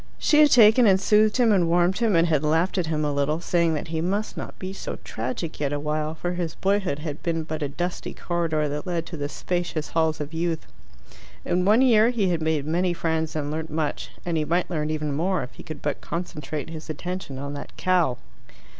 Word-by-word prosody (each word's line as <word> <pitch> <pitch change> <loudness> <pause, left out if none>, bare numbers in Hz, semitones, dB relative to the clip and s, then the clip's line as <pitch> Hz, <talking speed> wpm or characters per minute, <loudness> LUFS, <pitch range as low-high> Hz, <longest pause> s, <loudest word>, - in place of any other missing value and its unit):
She 300 - +3
had 300 -1 +7
taken 230 -1 +7
and 190 -1 +5
soothed 210 +2 +3
him, 240 -3 +4
and 180 -5 +3
warmed 175 +3 +3
him, 225 -5 +2
and 165 +1 +4
had 155 -3 +1
laughed 165 +5 +2
at 170 - -1
him 155 -1 0
a 145 - 0
little, 145 +3 0
saying 170 -2 +1
that 155 +2 -4
he 160 -1 -1
must 200 +5 -1
not - - -7
be 190 0 -5
so - - -5
tragic 130 +8 -4
yet 145 -1 0
awhile, 150 +2 -2
for 175 +2 -3
his 175 -3 -3
boyhood 195 -5 0
had 150 -1 -6
been 165 -1 -1
but 155 0 -5
a 145 - -1
dusty 175 +5 -4
corridor 165 -3 -1
that 150 +4 -4
led 170 -2 -1
to 170 - -7
the 145 -2 -3
spacious 175 -2 -3
halls 160 -1 +1
of 150 +1 -5
youth. 165 -1 -1 0.8
In 180 +1 +1
one 215 +6 +5
year 230 -3 +5
he 220 -6 +1
had 170 -2 0
made 155 -2 0
many 175 +3 +1
friends 160 -2 -1
and 145 -1 -2
learnt 160 +1 -4
much, 155 -1 -2 0.2
and 170 -2 0
he 155 - +1
might 175 +5 0
learn 155 -3 -1
even 150 -2 -2
more 180 +5 0
if 125 - -9
he - - -11
could 155 -2 -9
but 145 - -2
concentrate 155 -3 -5
his 160 -1 -8
attention 165 -2 -5
on 140 +1 -5
that 145 - -8
cow. 175 -9 +2
165 Hz, 225 wpm, -25 LUFS, 150-180 Hz, 0.8 s, had